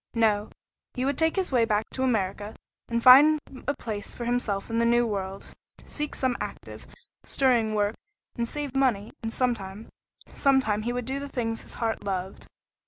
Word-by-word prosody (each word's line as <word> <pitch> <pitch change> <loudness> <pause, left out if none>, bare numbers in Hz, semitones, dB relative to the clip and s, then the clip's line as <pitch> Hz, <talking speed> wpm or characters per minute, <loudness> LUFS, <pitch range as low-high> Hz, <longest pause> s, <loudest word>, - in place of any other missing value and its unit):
No, 215 -2 +2 0.5
he 255 0 -1
would 280 +1 +1
take 320 +2 +1
his 380 -5 0
way 245 -3 +4
back 215 -1 +1
to 260 - -4
America, 210 -4 -1 0.3
and 235 0 -1
find 295 +5 +8 0.3
a 285 - +1
place 210 -3 -5
for 240 - -5
himself 235 -5 -1
in 230 - +1
the - - +3
new 240 +1 +4
world; 195 -3 -5 0.3
seek 300 -1 -5
some 260 -2 0
active, - - -7 0.4
stirring 235 -5 +2
work, 205 0 +1 0.4
and 235 0 -1
save 290 0 -5
money, 240 -6 +1
and 225 - -3
sometime 220 -4 -2 0.4
sometime 260 -7 +2
he 235 +3 -2
would 245 -1 -3
do 265 +3 -2
the 280 0 -6
things 225 -4 -3
his - - -12
heart 225 -1 -2
loved. 190 -1 -4
235 Hz, 175 wpm, -27 LUFS, 210-260 Hz, 0.5 s, find